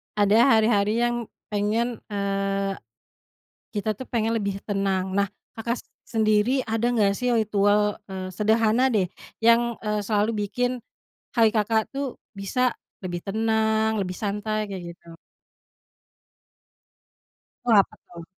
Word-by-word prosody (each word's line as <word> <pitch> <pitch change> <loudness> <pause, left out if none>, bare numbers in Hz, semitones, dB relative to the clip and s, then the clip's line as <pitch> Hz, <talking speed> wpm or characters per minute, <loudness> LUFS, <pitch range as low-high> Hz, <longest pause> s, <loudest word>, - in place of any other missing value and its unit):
Ada 205 +1 +4 0.2
hari-hari 220 0 +3
yang 240 -1 0 0.3
pengen, 220 +3 0
eee, 195 -1 -1 1.0
kita 215 0 -1
tuh 260 - -7
pengen 230 -1 0
lebih 200 -2 -2
tenang. 195 -2 -1
Nah, 200 0 +3 0.3
Kakak 235 +2 -2
s - - -20 0.3
sendiri 220 +3 +2
ada 225 +2 0
enggak 210 -4 +3
sih 250 - -1
ritual, 210 -1 +2
eee, 190 -1 -5
sederhana 220 +5 +2
deh 190 -4 +2 0.3
yang, 235 +1 +4
eee, 210 -1 -1
selalu 210 0 +2 0.2
bikin 245 +4 -1 0.6
hari 225 -1 +5
Kakak 220 0 +1
tuh 275 -2 -4 0.2
bisa 250 +6 +1 0.3
lebih 175 -1 -4
tenang, 220 +1 +1
lebih 180 -2 -3
santai, 210 0 -2
kayak 175 -3 -6
gitu? 165 -1 -15 2.5
Oh 240 - +4
apa 200 - +4
tuh? 170 -1 -11
215 Hz, 125 wpm, -25 LUFS, 200-225 Hz, 2.5 s, hari